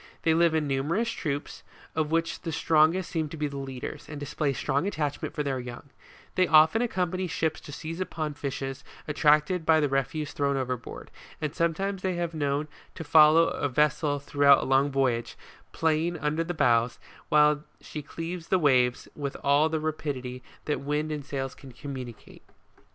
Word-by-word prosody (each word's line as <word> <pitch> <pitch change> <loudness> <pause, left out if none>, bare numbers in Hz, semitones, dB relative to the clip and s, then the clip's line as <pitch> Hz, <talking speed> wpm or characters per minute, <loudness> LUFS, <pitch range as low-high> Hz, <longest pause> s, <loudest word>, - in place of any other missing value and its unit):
They 160 - +4
live 165 0 +3
in 155 -2 +1
numerous 160 +13 0
troops, 145 -8 -4 0.3
of 155 -1 0
which 165 +1 -1
the 165 - -4
strongest 160 +3 +2
seem 160 -3 -1
to 160 - -8
be 150 - -1
the 140 -1 -4
leaders, 135 +2 -6
and 150 -2 -6
display 145 0 -1
strong 140 +5 -1
attachment 150 -7 -3
for 150 - -1
their 135 -2 -2
young; 125 +3 -9 0.4
they 185 -1 +3
often 160 +8 +6
ac 245 - +2
company 185 -1 -1
ships 160 -1 -1
to - - -10
seize 160 +4 -6
upon 155 -5 -3
fishes 135 -2 -5 0.2
attracted 150 +3 +3
by 160 0 +4
the 150 - +2
refuse 145 +3 -2
thrown 140 -1 0
overboard, 125 -2 -5 0.3
and 150 -1 -3
sometimes 185 +4 -1
they 185 -1 -1
have 170 -1 -2
been 160 - -7
known 145 +1 0 0.3
to - - -6
follow 155 +1 +6
a 145 - -2
ves 150 +3 +3
sel 145 -2 0
throughout 140 0 +4
a - - -3
long 135 +2 +3
voyage, 130 -4 0 0.3
playing 165 +2 0
under 150 +2 -1
the 175 +1 -4
bows, 120 -4 +2 0.3
while 150 0 +4 0.2
she 150 - -7
cleaves 165 +3 -6
the 190 - +3
waves 130 -6 +2
with 140 -2 -4
all 145 +3 +4
the 160 0 -1
rapidity 140 -5 -4 0.2
that 150 - -1
wind 150 +2 -1
and 150 -2 -4
sails 135 -2 -3
can 135 -2 -13
communicate. 125 -2 -9
150 Hz, 185 wpm, -27 LUFS, 140-160 Hz, 0.4 s, often